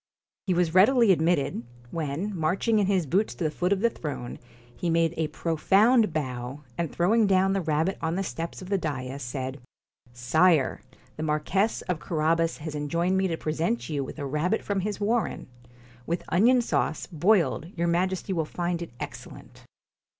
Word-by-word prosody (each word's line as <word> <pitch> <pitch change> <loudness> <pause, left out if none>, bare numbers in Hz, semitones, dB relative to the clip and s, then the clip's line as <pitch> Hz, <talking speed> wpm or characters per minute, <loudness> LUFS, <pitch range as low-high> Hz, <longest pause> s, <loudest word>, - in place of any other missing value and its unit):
He 185 - +2
was 170 -2 +1
readily 225 +3 +6
admitted, 160 -7 +1 0.3
when, 165 +6 -3
marching 185 +7 +1
in 200 - +2
his 190 -4 +2
boots 195 +9 0
to - - -4
the 155 - 0
foot 180 +4 -1
of 200 -1 +2
the 235 - +4
throne, 140 - -6 0.4
he 175 - -2
made 165 0 +2
a 160 -1 0
pro 165 +1 -3
found 215 +6 +4
bow, 130 -2 -4
and 170 -2 -2
throwing 210 +5 +3
down 190 0 +3
the 195 - 0
rabbit 160 +3 0
on 160 +1 -1
the 195 - -1
steps 170 0 -5
of 185 - -10
the 200 -1 +1
da'is, 140 -4 -4
said: 130 +2 -5 0.5
'Sire, 140 +5 +2 0.4
the - - -5
Marquess 155 +8 0
of 180 -4 -2
Carabas 165 +1 0
has 155 0 -6
enjoined 170 +5 0
me 190 0 +2
to 165 -2 -2
present 155 -7 -2
you 145 -3 -1
with 130 - -8
a 145 - -4
rabbit 150 +10 0
from 200 -1 -1
his 205 +1 -3
warren. 225 +3 -1 0.6
With 170 +1 -2
onion 240 +8 +4
sauce, 160 - -1
boiled, 175 -1 +2
your 170 - 0
Majesty 185 +3 0
will 165 -3 0
find 175 +2 -3
it 170 - -5
excellent.' - - -9
170 Hz, 180 wpm, -26 LUFS, 150-190 Hz, 0.6 s, readily